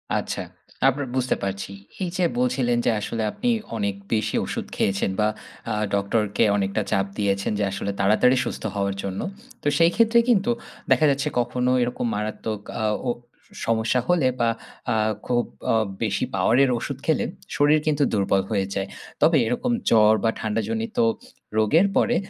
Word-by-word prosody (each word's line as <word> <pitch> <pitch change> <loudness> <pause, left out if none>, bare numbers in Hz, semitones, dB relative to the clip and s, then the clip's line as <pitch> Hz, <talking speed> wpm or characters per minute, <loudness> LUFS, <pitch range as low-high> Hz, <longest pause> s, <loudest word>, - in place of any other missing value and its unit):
আচ্ছা। - - -2 0.5
আপনার 135 0 -3
বুঝতে 130 -1 +1
পারছি। 100 0 -3 0.3
এই 175 - -1
যে 180 - +1 0.2
বলছিলেন 125 -1 +1
যে - - +4
আসলে 115 +2 -3
আপনি 245 - -2 0.3
অনেক 100 -2 -1 0.2
বেশি 110 -1 0
ওষুধ - - -4
খেয়েছেন। 100 0 0
বা 105 - +4 0.4
আ - - 0 0.2
ডক্টর 100 +2 +1 0.2
কে 115 - +5
অনেকটা 100 +2 0
চাপ 95 0 +2
দিয়েছেন 100 -1 0
যে - - +1
আসলে 100 +1 -3
তাড়াতাড়ি 110 +6 +4
সুস্থ - - -5
হওয়ার 100 -1 -1
জন্য। 95 -1 -4 0.4
তো - - -3
সেই 165 0 +5
ক্ষেত্রে 230 +1 +5
কিন্তু, 235 0 +3 0.4
দেখা 155 - +5
যাচ্ছে 140 +2 -1
কখনো 125 +1 0
এরকম 120 0 -1
মারাত্মক 105 0 -3 0.2
আ - - 0 0.2
ও - - +2 0.6
সমস্যা 115 +2 +1
হলে 170 -7 +3
বা 115 - +3 0.4
আ - - +1 0.3
খুব 120 -1 +1 0.3
আ - - +3 0.3
বেশি - - 0
পাওয়ারের 130 +3 +4
ওষুধ - - -4
খেলে - - +2 0.3
শরীর 145 +2 +4
কিন্তু 150 -1 +2
দুর্বল 100 -1 +2
হয়ে 100 -2 +1
যায়। 95 0 -1 0.3
তবে 160 -2 +5
এরকম 240 - -1 0.2
জ্বর 110 -1 +6
বা 115 - +3
ঠান্ডাজনিত 110 +1 -2 0.6
রোগের 155 - +4
পরে 245 - +3
115 Hz, 160 wpm, -24 LUFS, 100-135 Hz, 0.6 s, জ্বর